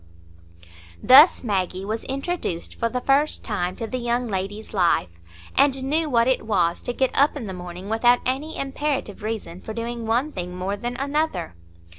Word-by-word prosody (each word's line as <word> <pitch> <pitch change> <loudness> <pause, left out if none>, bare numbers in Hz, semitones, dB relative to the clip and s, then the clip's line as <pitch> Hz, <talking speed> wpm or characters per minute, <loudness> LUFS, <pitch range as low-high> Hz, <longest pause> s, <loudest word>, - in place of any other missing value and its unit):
Thus 285 +5 +8
Maggie 190 -3 -1
was 220 +2 -3
introduced 275 - -3
for 230 - -1
the 250 +1 -3
first 280 +4 +2
time 185 -4 -2
to 230 - -4
the 255 +3 -4
young 240 +1 -1
lady's 205 +2 -4
life, 175 - +2 0.4
and 270 -1 +3
knew 305 +3 0
what 235 -2 +3
it 260 - +2
was 175 -5 +1
to - - -3
get 260 +1 0
up 285 +2 +4
in 250 - -5
the 190 - -5
morning 180 +1 -8
without 240 +3 +4
any 280 +5 -2
imperative 275 -6 -3
reason 210 -5 -5
for 220 - -7
doing 235 0 -4
one 245 +7 +1
thing 180 -4 -5
more 185 +2 -2
than 240 +3 -5
another. 280 - -1
230 Hz, 175 wpm, -23 LUFS, 195-270 Hz, 0.4 s, Thus